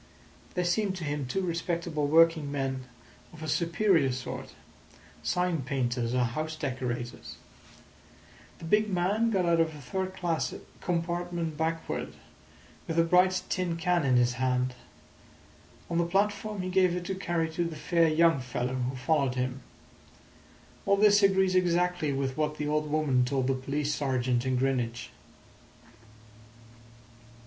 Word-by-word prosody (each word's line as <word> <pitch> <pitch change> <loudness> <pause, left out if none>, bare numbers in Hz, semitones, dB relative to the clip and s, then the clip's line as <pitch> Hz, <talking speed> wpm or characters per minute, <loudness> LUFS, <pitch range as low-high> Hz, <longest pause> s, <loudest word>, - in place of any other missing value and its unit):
They 180 - +1
seemed 190 +2 0
to 185 - -6
him 145 -3 -2
two 190 +9 -1
respectable 170 -3 -2
working 160 -1 +4
men 135 -2 -2 0.5
of 160 -2 -11
a - - -4
superior 170 -2 +2
sort—sign 170 +6 -5
painters 125 -3 -1
or 125 - +3
house 155 +6 -3
decorators. 125 -5 -4 1.2
The - - -10
big 210 +5 +2
man 200 +5 +1
got 190 -5 +1
out 170 -1 +3
of 160 -1 +1
a - - -9
third 185 +8 -4
class 170 -3 -1 0.2
compartment 170 -2 -2
backward, 160 +1 -3 0.7
with 165 - -3
a 165 - +6
bright 180 +2 +3
tin 180 -3 -1
can 175 -1 +1
in 130 -2 +3
his 120 0 +3
hand. 125 0 +1 1.1
On 170 - -1
the - - +3
platform 205 +2 0
he 185 - -3
gave 185 -2 +3
it 180 0 -4
to 190 - -2
carry 175 -3 -1
to 170 +2 -1
the 165 -1 -4
fair 165 +2 +2
young 165 -1 +4
fellow 125 0 -3
who 130 0 -2
followed 135 -1 +1
him. 130 +1 -2 1.3
All 200 - +4
this 205 0 +5
agrees 190 -1 +4
exactly 180 -3 +1
with 135 -1 -2
what 150 0 -1
the 150 - -2
old 150 0 0
woman 145 -4 +2
told 130 +1 0
the 135 - +2
police 140 +3 -2
sergeant 130 -3 0
in 130 - +1
Greenwich." 125 -3 -1
160 Hz, 145 wpm, -29 LUFS, 130-180 Hz, 1.3 s, a